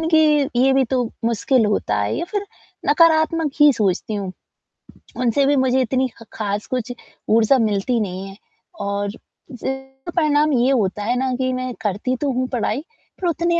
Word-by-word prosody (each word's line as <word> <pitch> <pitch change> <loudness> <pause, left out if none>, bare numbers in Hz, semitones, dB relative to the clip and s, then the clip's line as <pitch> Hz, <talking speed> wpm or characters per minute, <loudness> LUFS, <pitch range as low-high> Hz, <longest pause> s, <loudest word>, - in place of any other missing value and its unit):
इनकी 310 -3 +3
ये 265 +1 +4
भी 265 0 +3
तो 250 +1 0 0.2
मुश्किल 235 +1 +2
होता 105 - 0
है 100 0 -1
या 340 - -2
फिर 410 -1 -2 0.4
नकारात्मक 315 0 +3
ही 295 -1 +8
सोचती 210 -1 -1
हूँ। 195 -2 -4 0.9
उनसे 255 +3 +2
भी 285 +1 +3
मुझे 260 0 +2
इतनी 260 +2 +1
ख - - -12
खास 205 -1 -3
कुछ 250 -1 -3 0.4
ऊर्जा 225 +4 +4
मिलती 220 +2 +1
नहीं 190 -1 -4
है, 195 - -10 0.4
और 200 0 -2
जिस 230 +3 -14 0.5
का 345 - -3
परिणाम 300 -3 +3
ये 250 +2 +3
होता 210 -5 0
है 240 +3 0
ना 260 -1 0
कि 255 0 -1
मैं 255 0 -3
करती 210 +5 -1
तो 285 -2 +1
हूँ 255 +1 -1
पढ़ाई, 250 +1 -1 0.4
पर 360 - 0
उतने 340 +1 +1
255 Hz, 175 wpm, -21 LUFS, 215-290 Hz, 0.9 s, ही